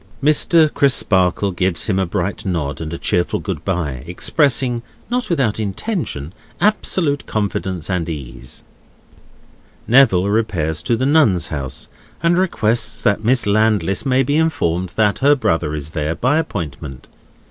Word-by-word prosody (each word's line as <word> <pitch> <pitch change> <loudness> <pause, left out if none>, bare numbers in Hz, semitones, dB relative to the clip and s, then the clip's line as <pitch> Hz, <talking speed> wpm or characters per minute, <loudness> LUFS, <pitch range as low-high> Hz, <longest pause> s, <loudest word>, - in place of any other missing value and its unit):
Mr. 155 +1 +4
Crisparkle 100 -8 +2
gives 90 0 0
him 95 -3 0
a 95 - 0
bright 90 +3 -3
nod 80 -7 -3
and 80 -1 -5
a 85 - -4
cheerful 85 +1 0
good - - -5
bye; 80 -9 -2
expressing 125 - +1 0.3
(not 250 0 -1
without 135 - 0
intention) 100 - -3 0.3
absolute 180 -8 +1
confidence 95 -5 -2
and 90 -3 -2
ease. 65 -5 -7 1.2
Neville 110 -7 +5
repairs 95 -8 -1
to 120 - 0
the 130 - 0
Nuns' 115 - +3
House, 70 -4 -5 0.4
and 170 +1 +3
requests 120 - 0
that 100 +1 +1
Miss 125 +2 +2
Landless 105 -1 +1
may 135 -1 +2
be 145 +4 0
informed 95 - 0
that 105 -2 +2
her 145 +2 +5
brother 80 - 0
is 75 0 -6
there, 80 0 -2
by 130 - +1
appointment. 75 - -6
100 Hz, 140 wpm, -19 LUFS, 85-135 Hz, 1.2 s, Neville